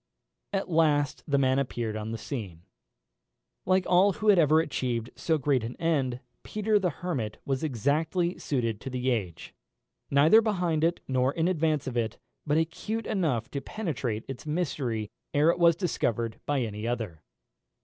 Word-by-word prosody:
At 195 -1 -1
last 150 -4 +2
the 140 -2 +2
man 130 0 +3
appeared 120 -5 -2
upon 110 0 -4
the 115 - -3
scene. 100 - -6 1.0
Like 185 0 +3
all 185 +3 +5
who 215 +3 0
have 195 -4 +7
ever 155 0 +5
achieved 125 -7 -2
so 160 -2 +1
great 135 -4 +1
an 115 +2 -5
end, 135 -7 0 0.2
Peter 215 0 +1
the 185 -2 +1
Hermit 140 -11 -4
was 135 0 -1
exactly 155 - 0
suited 115 -6 -1
to - - -5
the 130 0 -1
age; 95 -9 -3 0.6
neither 155 +11 +6
behind 180 -8 0
it 170 +1 +1
nor 130 0 +2
in 165 0 +1
advance 155 -5 +1
of 125 -2 -3
it; 115 -1 -1 0.3
but 150 +1 +3
acute 180 +8 -2
enough 150 - -1
to 140 - -3
penetrate 135 - -3
its 135 +3 -7
mystery 135 - -2 0.2
ere 150 +3 +5
it - - -4
was 170 -1 +6
discovered 115 - -1
by 145 -2 +1
any 110 -1 -3
other. 110 -10 -3
145 Hz, 165 wpm, -28 LUFS, 120-170 Hz, 1.0 s, have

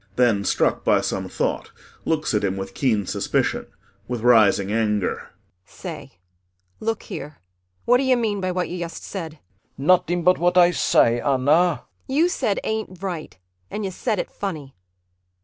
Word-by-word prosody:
[Then 115 -5 +3
struck - - +1
by - - +3
some - - -3
thought - - -2 0.4
looks 155 -5 0
at 105 - +1
him 95 -1 0
with 95 0 -6
keen 110 -6 +1
suspicion - - -1 0.4
with 120 -2 -3
rising 110 -4 +4
anger.] 105 -3 -1 0.3
Say, - - -9 0.7
look 225 0 -2
here, 145 +2 -7 0.5
what 245 - +5
d'you 260 -1 +2
mean 210 -4 -1
by 185 0 -1
what 180 0 -1
you 180 - -5
yust 170 -1 -6
said? 165 -6 -6
CHRIS 155 - -23 0.4
[Hastily.] 135 - -6
Nutting 175 0 +3
but 180 +2 +4
what 175 +1 +2
Ay 175 -1 +7
say, 120 -7 +3
Anna. 135 -3 +1
ANNA 170 -4 +3 0.2
You 310 +6 +2
said 250 - 0
"ain't 215 -4 -4
right" 175 - -5 0.3
and 210 -1 -4
you 190 - -3
said 215 +3 -2
it - - -3
funny. 155 -9 -5
170 Hz, 165 wpm, -23 LUFS, 120-195 Hz, 0.7 s, Ay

